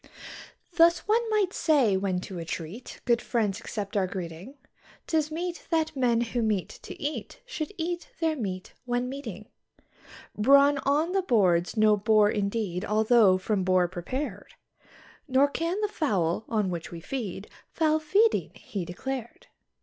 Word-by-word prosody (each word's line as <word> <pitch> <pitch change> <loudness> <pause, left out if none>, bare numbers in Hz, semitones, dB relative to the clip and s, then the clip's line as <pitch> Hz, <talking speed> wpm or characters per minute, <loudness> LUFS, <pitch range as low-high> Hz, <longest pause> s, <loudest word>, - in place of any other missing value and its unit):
Thus, 335 +3 +5
one 455 +2 +2
might 415 -4 +1
say, 275 - +3
when 190 -1 -1
to 185 -2 -7
a - - -4
treat 165 +8 -7
good 235 -1 +3
friends 215 -4 -1
accept 210 -3 -5
our 195 -2 +2
greeting, 180 - -7 0.5
'Tis 310 -2 0
meet 345 +2 -5
that 320 -2 0
men 240 -3 +2
who 240 +1 -1
meet 210 -5 0
to - - -10
eat 295 +2 -4
should 370 -9 -5
eat 345 +1 -3
their 320 -2 +1
meat 190 -8 -5
when 245 0 -1
meeting. 225 -7 -7 0.9
Brawn 280 +5 +5
on 300 +5 +2
the 390 0 +2
board's 190 - +2
no 215 0 +5
bore 210 0 +4
indeed 200 -3 -2
although 215 -2 +4
from 190 +1 -1
boar 185 -1 +3
prepared; 200 - -5 0.7
Nor 270 +1 +4
can 335 +6 -2
the 420 - +2
fowl, 210 - -1
on 210 -5 0
which 170 -2 -5
we 170 - -8
feed, 205 -1 -5 0.2
foul 315 -1 +1
feeding 400 +9 +2
he 195 -4 -5
declared. 240 +7 -6
230 Hz, 150 wpm, -27 LUFS, 195-305 Hz, 0.9 s, Thus